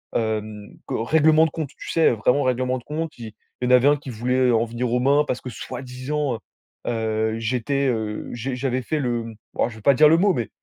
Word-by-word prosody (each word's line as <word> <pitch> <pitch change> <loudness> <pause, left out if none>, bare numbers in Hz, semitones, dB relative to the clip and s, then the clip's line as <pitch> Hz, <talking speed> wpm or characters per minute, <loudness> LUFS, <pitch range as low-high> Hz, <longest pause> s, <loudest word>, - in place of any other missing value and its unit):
hem, 110 -2 -2 0.2
co 110 - -2
règlement 160 +4 +4
de - - -1
compte. 155 -3 -4
Tu - - -8
sais? 165 -1 +4
Vraiment 125 +5 +2
règlement 130 0 0
de 125 - -11
compte, 155 +2 -4
il 110 -2 -8 0.3
il - - 0
y - - 0
en - - +1
avait 125 +2 +4
un 145 - +3
qui 140 - -10
voulait 125 +2 +1
en 115 -1 +3
venir 120 +1 -3
aux 125 - +2
mains 140 +3 +4
parce 125 - -2
que 130 - -7
soi-disant, 130 +3 -4 0.5
heu - - +1
heu 110 -1 -1
j'étais, 125 +4 0
heu, 110 -3 -3
j'ai 125 +2 -3
j'avais 130 0 -1
fait 150 +5 -2
le 120 -4 -2 0.2
oh - - +2
je 115 - -11
vais 110 - -12
pas 140 +6 +5
dire 150 +3 +6
le 165 - +5
mot 195 +2 +3
mais, 120 -7 -3
125 Hz, 235 wpm, -23 LUFS, 115-140 Hz, 0.5 s, dire